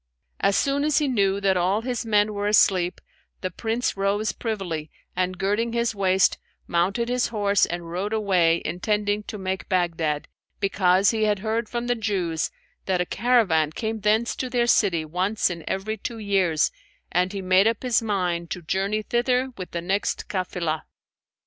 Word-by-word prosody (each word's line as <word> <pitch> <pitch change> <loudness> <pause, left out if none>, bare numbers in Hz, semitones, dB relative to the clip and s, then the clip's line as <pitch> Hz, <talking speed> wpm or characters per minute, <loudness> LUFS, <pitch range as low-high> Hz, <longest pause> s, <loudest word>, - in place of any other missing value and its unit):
As 200 0 +2
soon 280 +1 +1
as 300 -1 +2
he 300 - +2
knew 200 -6 +1
that 195 -1 +3
all 185 +4 +1
his 245 -2 -3
men 210 -1 +3
were 205 0 -2
asleep, 185 -4 +3 0.4
the 185 - -3
Prince 225 +6 -1
rose 200 +2 0
privily 180 -9 -4 0.3
and 185 0 -1
girding 205 +5 0
his 235 -1 0
waist, 190 -2 +2 0.3
mounted 195 +7 0
his 250 0 +1
horse 205 -3 +2
and 175 0 -5
rode 190 +4 -2
away 185 -6 +2
intending 205 +4 0
to 215 - -6
make 190 -1 -4
Baghdad, 165 -5 0 0.3
because 195 0 +3
he 220 -1 +1
had 210 -1 +2
heard 225 +1 -1
from 240 0 -3
the 245 - +2
Jews 190 -8 -1 0.4
that 185 -2 +1
a 180 - +1
caravan 200 -10 +2
came 220 +2 -3
thence 215 +3 +1
to 255 - -3
their 245 -1 +1
city 185 -9 +2
once 185 +6 0
in 170 -2 -6
every 215 +3 -2
two 230 +3 -5
years 190 -7 +1 0.4
and 180 +2 +1
he 200 -2 -5
made 185 +3 +4
up 225 +1 0
his 245 -3 +2
mind 180 -6 -1
to 180 - -5
journey 195 +5 -1
thither 250 +3 +1
with 185 -2 -7
the 170 - -4
next 195 +4 -1
cafilah. 180 -5 -2
200 Hz, 175 wpm, -24 LUFS, 180-220 Hz, 0.4 s, made